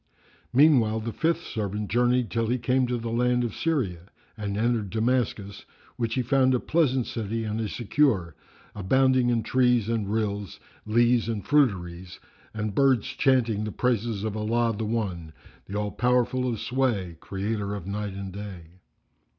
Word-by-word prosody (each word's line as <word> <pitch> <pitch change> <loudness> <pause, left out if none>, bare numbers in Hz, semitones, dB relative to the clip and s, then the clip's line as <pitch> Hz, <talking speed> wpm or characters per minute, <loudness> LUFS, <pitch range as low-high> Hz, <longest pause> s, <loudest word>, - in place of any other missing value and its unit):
Meanwhile, 125 -6 +4
the 115 0 -4
fifth 165 +1 0
servant 105 -1 -4
journeyed 125 +1 +2
till 115 -1 0
he 125 +3 +1
came 125 +1 +1
to 125 0 -1
the 115 0 -4
land 125 +1 +2
of 115 -3 -3
Syria 105 - -2 0.3
and 100 -2 -4
entered 115 -2 0
Damascus, 110 -3 -1 0.3
which 115 -1 -2
he 130 - +1
found 130 +1 +3
a - - +1
pleasant 135 -6 +1
city 115 0 -3
and 110 +1 -2
a 110 - -2
secure, 105 - +1 0.4
abounding 130 +5 +2
in 115 -2 +1
trees 125 -3 +2
and 110 -3 -1
rills, 105 -3 -2 0.3
leas 120 +1 +3
and 105 -3 -3
fruiteries 95 -10 0 0.3
and 105 -1 -3
birds 130 -2 +3
chanting 125 -5 +1
the 110 - -3
praises 115 -4 -1
of 110 -1 -3
Allah 115 +1 0
the 110 +1 -3
One, 95 -8 -3 0.3
the 100 - -4
All 105 0 -2
powerful 125 +3 +1
of 115 - -4
sway, 115 -7 -1
Creator 100 +2 -3
of 100 -4 -7
Night 100 0 -4
and 100 -1 -6
Day. 95 -4 -9
115 Hz, 160 wpm, -26 LUFS, 100-125 Hz, 0.4 s, Meanwhile